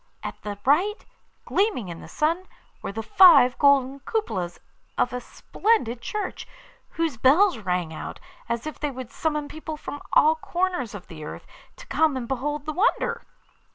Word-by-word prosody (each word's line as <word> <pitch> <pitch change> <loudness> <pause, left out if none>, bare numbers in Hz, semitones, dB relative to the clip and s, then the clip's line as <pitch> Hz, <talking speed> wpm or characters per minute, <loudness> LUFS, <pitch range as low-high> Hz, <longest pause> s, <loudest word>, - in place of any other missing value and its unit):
At - - -6
the 205 -1 -5
right, 365 - +2 0.4
gleaming 385 - 0
in 170 -1 -7
the - - -10
sun, 335 +5 0 0.3
were - - -4
the 225 +2 -5
five 340 - +7
golden 280 -1 +4
cupolas 215 - -3 0.4
of - - +1
a 250 - -3
splendid 250 - 0
church, 420 - -4 0.4
whose 325 -7 -2
bells 305 - +4
rang 180 -5 -2
out, - - -7 0.3
as 235 +2 -2
if 310 - -6
they 295 - -1
would 260 -2 -8
summon 300 0 -2
people 315 +1 -7
from 290 -1 -7
all 310 +1 +6
corners 345 - -2
of 200 - -9
the 155 -2 -10
earth - - -8 0.3
to - - -12
come 315 -4 +2
and 240 -2 -4
behold 285 +3 -2
the 310 - -3
wonder. 400 +10 +1
285 Hz, 165 wpm, -25 LUFS, 235-335 Hz, 0.4 s, five